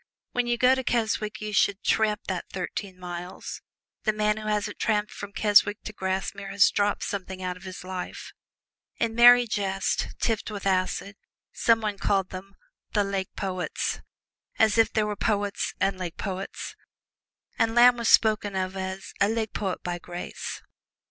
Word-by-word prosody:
When 245 -1 0
you 240 0 +1
go 255 +2 +5
to 260 0 -1
Keswick 220 -3 -1
you 215 0 -4
should 200 0 +2
tramp 215 -1 +2
that 185 -2 -3
thirteen 190 0 -5
miles 180 0 -7 0.4
the 215 - +3
man 210 0 +1
who 215 0 -6
hasn't 210 -1 -1
tramped 210 -1 +1
from 200 0 -8
Keswick 205 0 +4
to 215 - -6
Grasmere 195 0 -3
has 200 +1 +5
dropped 205 0 +1
something 190 -1 -4
out 180 0 -2
of 180 +2 -13
his 185 -1 -7
life. 185 0 -6 0.6
In 230 -1 0
merry 245 +1 +8
jest, 195 -3 -1
tipped 225 -3 0
with 205 -2 -6
acid, 195 +1 0 0.4
some 230 -1 +3
one 210 -2 -2
called 195 -2 +1
them 195 +1 -9 0.4
"The 205 - +3
Lake 195 -1 -3
Poets," 185 -2 -2 0.6
as 220 0 +4
if 225 - +4
there 215 -1 +1
were 210 0 -2
poets 205 -1 -1
and 195 -1 +1
lake 175 -3 -5
poets. 195 -1 -5 0.8
And 225 0 +2
Lamb 245 +1 +7
was 235 -1 0
spoken 210 -2 +4
of 185 0 -2
as 190 +1 -5
"a 200 - +5
Lake 220 -1 -2
Poet 190 -3 -3
by 175 -1 -3
grace." 175 0 -6
205 Hz, 170 wpm, -26 LUFS, 190-215 Hz, 0.8 s, merry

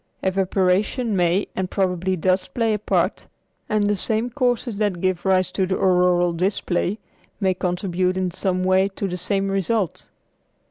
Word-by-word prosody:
Evaporation 195 +4 +1
may 180 +2 +2
and 185 -1 -2
probably 185 -1 0
does 185 +2 +1
play 230 -2 0
a 210 - -1
part, - - 0 0.4
and 215 -1 +2
the 205 0 +2
same 220 +4 -1
causes 245 -4 0
that 205 -4 0
give 185 0 -1
rise 185 -1 +2
to 190 -2 0
the 185 - 0
auroral 180 -1 +3
display 185 +1 -1 0.4
may 190 -3 +2
contribute 180 0 -1
in 185 -1 -1
some 185 0 -1
way 185 +1 +3
to 200 0 -4
the 180 - -4
same 195 +2 -1
result. 195 -1 -1
190 Hz, 155 wpm, -22 LUFS, 180-205 Hz, 0.4 s, auroral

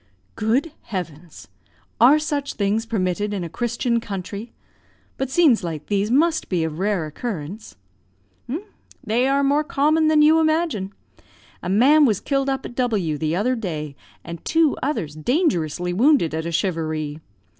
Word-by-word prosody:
"Good 245 +9 0
heavens! 165 - -7 0.5
are 255 +7 +7
such 290 -2 -2
things 210 +2 0
permitted 205 -1 -1
in 190 - -3
a 170 - -5
Christian 235 +4 -1
country? 200 +1 -6 0.6
But 265 -1 -3
scenes 270 - +4
like 160 -3 -5
these 205 0 0
must 320 +6 +2
be 175 -4 0
of 160 0 -4
rare 195 -4 0
occurrence?" 185 +3 -6 1.3
"They 235 +4 +1
are 275 +1 +2
more 285 +2 +2
common 305 +2 +2
than 310 -1 +5
you 315 +2 +6
imagine. 315 - 0 0.7
A - - -4
man 275 +10 +5
was 215 -7 +2
killed 275 -1 -1
up 270 0 -2
at - - -7
W 210 - -1
the 155 +1 -1
other 240 +7 +1
day, 155 - -5 0.3
and 170 0 -8
two 320 -2 +2
others 255 - -2
dangerously 175 - 0
wounded, 240 - +3
at 160 +1 -3
a - - -3
charivari. 155 -4 -2
215 Hz, 150 wpm, -22 LUFS, 170-275 Hz, 1.3 s, are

